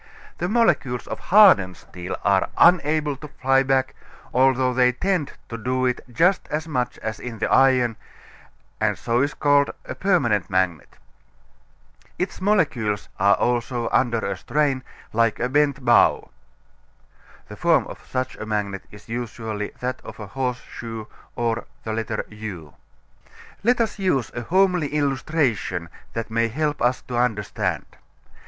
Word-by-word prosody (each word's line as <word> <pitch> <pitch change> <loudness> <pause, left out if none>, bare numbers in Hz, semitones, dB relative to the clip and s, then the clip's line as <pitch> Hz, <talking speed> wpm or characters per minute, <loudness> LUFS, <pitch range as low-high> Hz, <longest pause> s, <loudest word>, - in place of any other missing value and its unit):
The 175 - -1
molecules 175 - +1
of - - -6
hardened 175 - +5
steel 90 0 -7
are 100 -2 +2
unable 155 -4 +4
to 150 - -9
fly 135 -2 +2
back, 130 -1 +1 0.4
although 130 0 +3
they 125 0 +3
tend 180 0 -1 0.2
to 115 - -6
do 130 +2 0
it 125 -1 0
just 175 +9 +2
as 155 +2 -3
much 125 -5 -2
as 110 0 -4
in 120 -2 -7
the 110 - -1
iron, 130 -4 +4 0.8
and - - +1
so 120 +1 0
it - - +4
is 145 - -5
called 145 -1 +3 0.2
a - - -5
permanent 130 - +1
magnet. 95 -5 -1 1.2
Its 185 +1 -3
molecules 150 - +1
also 120 +4 +1
are - - -1
under 120 -3 0
a 100 0 -2
strain, 135 +6 0 0.3
like 115 -1 +2
a 125 - +1
bent 140 -1 +1
bow. - - +4 1.2
(The - - -9
form - - +3
of - - -10
such 130 0 -3
a - - -6
magnet 100 -3 -2
is 105 0 -15
usually 110 -3 -4
that 125 +1 -3
of - - -10
a 105 - -6
horse 125 +4 -3
shoe, 115 -2 -8 0.3
or 115 -1 -1 0.2
U.) 110 -6 -5 0.9
Let 240 +3 +3
us 225 -2 -1
use 180 -10 0
a 120 - -4
homely 180 +2 +2
illustration 135 - 0 0.2
that 115 0 -4
may 115 +1 +2
help 150 +5 -2
us 125 +1 +1
to 125 - -4
understand. 110 -4 -1
125 Hz, 145 wpm, -23 LUFS, 110-145 Hz, 1.2 s, hardened